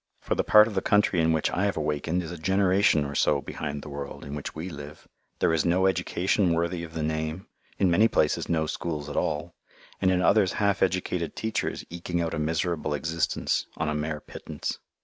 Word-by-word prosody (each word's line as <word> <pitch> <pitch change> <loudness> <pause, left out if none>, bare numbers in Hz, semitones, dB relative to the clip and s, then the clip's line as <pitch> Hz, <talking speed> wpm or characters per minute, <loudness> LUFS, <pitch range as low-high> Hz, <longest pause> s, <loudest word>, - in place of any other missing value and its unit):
For - - -2
the - - 0
part 105 0 +7
of 110 - -5
the 95 - 0
country 105 -4 +3
in 80 0 +3
which 80 -1 +1
I 95 - 0
have 100 - 0
awakened 80 +3 -1
is 80 - -7
a 85 - -6
generation 95 -2 +3
or 70 - -5
so - - +2
behind 75 -2 -5
the - - -8
world 70 0 -7
in 70 - -7
which 75 -1 -5
we 80 +3 -5
live. 75 -3 -9 0.3
There - - +2
is 80 - +2
no 90 +2 +2
education 90 -1 +1
worthy 85 +1 -1
of 80 -1 -9
the 80 - -2
name, 80 +3 -2 0.3
in 95 -3 +3
many 105 +6 +5
places 75 -8 +1
no 80 -2 +1
schools 75 -2 -4
at - - -6
all, 80 +2 -1 0.5
and 95 - +4
in 90 -1 +2
others 100 -2 +4
half 100 -2 +1
educated 90 -2 0
teachers 110 -1 -2
eking 85 0 -3
out 85 -1 -1
a - - -2
miserable 80 -1 -1
existence 80 +3 -1
on 80 -2 -1
a - - -1
mere 75 0 -2
pittance. - - -6
85 Hz, 210 wpm, -27 LUFS, 75-95 Hz, 0.5 s, part